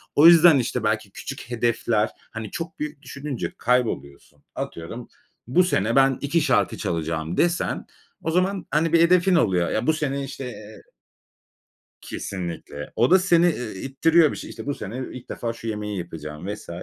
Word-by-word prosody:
O 150 Hz, +3 st, +8 dB
yüzden, 170 Hz, -3 st, +8 dB
işte, 125 Hz, -1 st, -2 dB
belki 105 Hz, -2 st, -1 dB
küçük -, -, -7 dB
hedefler, 115 Hz, -2 st, +1 dB, 0.2 s
hani, 110 Hz, -2 st, -6 dB
çok 165 Hz, -1 st, -6 dB
büyük 150 Hz, -1 st, -5 dB
düşününce 140 Hz, -3 st, -5 dB
kayboluyorsun. 115 Hz, -, -1 dB
Atıyorum 115 Hz, +9 st, -6 dB, 0.4 s
bu 155 Hz, +9 st, +4 dB
sene 115 Hz, -, +1 dB
ben 135 Hz, -1 st, +4 dB
2 155 Hz, +4 st, +1 dB
şarkı -, -, +2 dB
çalacağım 80 Hz, 0 st, -2 dB
desen 175 Hz, 0 st, 0 dB, 0.4 s
o 160 Hz, -, -1 dB
zaman, 185 Hz, +2 st, 0 dB
hani, 160 Hz, +3 st, +1 dB
bir 165 Hz, -, +6 dB
hedefin 180 Hz, +2 st, +4 dB
oluyor. 95 Hz, -, +2 dB
Ya, 110 Hz, +5 st, -1 dB
bu 160 Hz, -, +5 dB
sene 140 Hz, -3 st, -2 dB
işte, 135 Hz, 0 st, -7 dB
eee 110 Hz, -3 st, -10 dB, 1.2 s
Kesinlikle. 85 Hz, -6 st, -6 dB
O 120 Hz, +6 st, +3 dB
da 190 Hz, -, +8 dB
seni, 175 Hz, -2 st, +4 dB
eee, 115 Hz, -9 st, -6 dB
ittiriyor 155 Hz, +4 st, +3 dB
bir -, -, -6 dB
şey. -, -, -8 dB
İşte, -, -, -8 dB
bu 145 Hz, -, -1 dB
sene 110 Hz, +2 st, -6 dB
ilk 125 Hz, -1 st, -10 dB
defa 115 Hz, -1 st, -3 dB
şu 115 Hz, 0 st, -9 dB
yemeği 105 Hz, -1 st, -3 dB
yapacağım 80 Hz, -1 st, -7 dB
vs. 105 Hz, -, -11 dB
125 Hz, 170 wpm, -24 LUFS, 105-160 Hz, 1.2 s, O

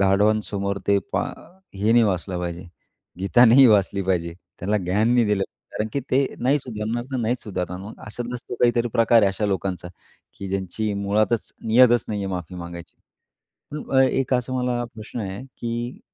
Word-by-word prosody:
गाढवांसमोर 100 Hz, 0 st, +1 dB
ते 100 Hz, 0 st, +4 dB
पा -, -, +1 dB, 0.5 s
हे 105 Hz, +4 st, +1 dB
नाही 120 Hz, -1 st, +6 dB
वाचलं 90 Hz, -2 st, -1 dB
पाहिजे, 85 Hz, +1 st, -5 dB, 0.5 s
गीता 100 Hz, +6 st, +5 dB
नाही 130 Hz, +3 st, +8 dB
वाचली 100 Hz, -3 st, +3 dB
पाहिजे. 85 Hz, -3 st, -1 dB, 0.3 s
त्याला 105 Hz, +3 st, 0 dB
ज्ञान 100 Hz, +5 st, +1 dB
नाही 120 Hz, -2 st, +4 dB
दिलं 105 Hz, -2 st, +1 dB
पाहिजे, -, -, -16 dB
कारण 110 Hz, -, -1 dB
की 140 Hz, -, -1 dB
ते 135 Hz, +1 st, +3 dB, 0.2 s
नाही 140 Hz, +4 st, +3 dB
सुधारणार 115 Hz, -1 st, -4 dB
ना 135 Hz, -, -2 dB
नाहीच 120 Hz, +3 st, -1 dB
सुधारणार 90 Hz, -3 st, -4 dB
मग. 105 Hz, +3 st, -9 dB
अशातलाच 120 Hz, +2 st, -5 dB
तो -, -, -4 dB
काहीतरी 120 Hz, 0 st, +3 dB
प्रकार 115 Hz, 0 st, +4 dB
आहे 100 Hz, -, +5 dB
अशा 105 Hz, +2 st, -2 dB
लोकांचा, 95 Hz, -2 st, -2 dB, 0.5 s
की 100 Hz, -, -6 dB
ज्यांची 100 Hz, +3 st, -2 dB
मुळातच 105 Hz, +3 st, 0 dB
नियतच 120 Hz, +1 st, +5 dB
नाहीये 100 Hz, -2 st, -2 dB
माफी 90 Hz, 0 st, -6 dB
मागायची. 85 Hz, -1 st, -9 dB, 0.8 s
अ, 150 Hz, -, -4 dB, 0.2 s
अ, -, -, +7 dB
एक 130 Hz, 0 st, +1 dB
असा 125 Hz, +1 st, -1 dB
मला 125 Hz, -1 st, -1 dB
प्रश्न 110 Hz, +2 st, -7 dB
आहे 95 Hz, +4 st, -5 dB, 0.2 s
की 120 Hz, +1 st, -4 dB
105 Hz, 175 wpm, -23 LUFS, 95-120 Hz, 0.8 s, नाही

